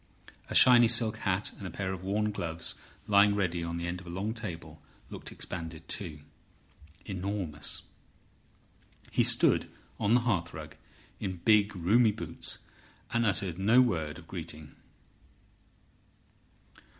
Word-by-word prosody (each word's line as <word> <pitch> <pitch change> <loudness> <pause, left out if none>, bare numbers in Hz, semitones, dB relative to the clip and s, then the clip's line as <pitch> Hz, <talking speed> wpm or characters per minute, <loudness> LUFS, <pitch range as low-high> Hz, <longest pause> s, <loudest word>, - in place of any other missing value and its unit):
A - - -4
shiny 120 -2 +8
silk 115 -1 +4
hat 95 -1 -1
and 100 - -5
a - - -5
pair 95 0 -3
of 95 - -7
worn 105 +2 0
gloves 85 -4 -3 0.3
lying 100 0 +5
ready 90 -4 -1
on 85 0 -3
the 85 - -3
end 90 +1 -4
of 90 - -14
a - - -7
long 95 +5 -3
table 105 -8 -7 0.3
looked - - -7
expanded 80 -1 -6
too, 80 -7 -4 0.8
enormous. 95 -6 -4 1.3
He - - +3
stood - - +4 0.3
on 105 +4 +3
the 125 - +4
hearthrug 85 - -2 0.5
in 95 -3 -4
big, 105 -2 +4
roomy 105 +6 +4
boots, 110 - -3 0.6
and 115 -1 +2
uttered 95 -3 -1
no 110 +6 +5
word 80 -12 +1
of 85 -2 -13
greeting. 80 -5 -8
95 Hz, 135 wpm, -30 LUFS, 85-105 Hz, 1.3 s, shiny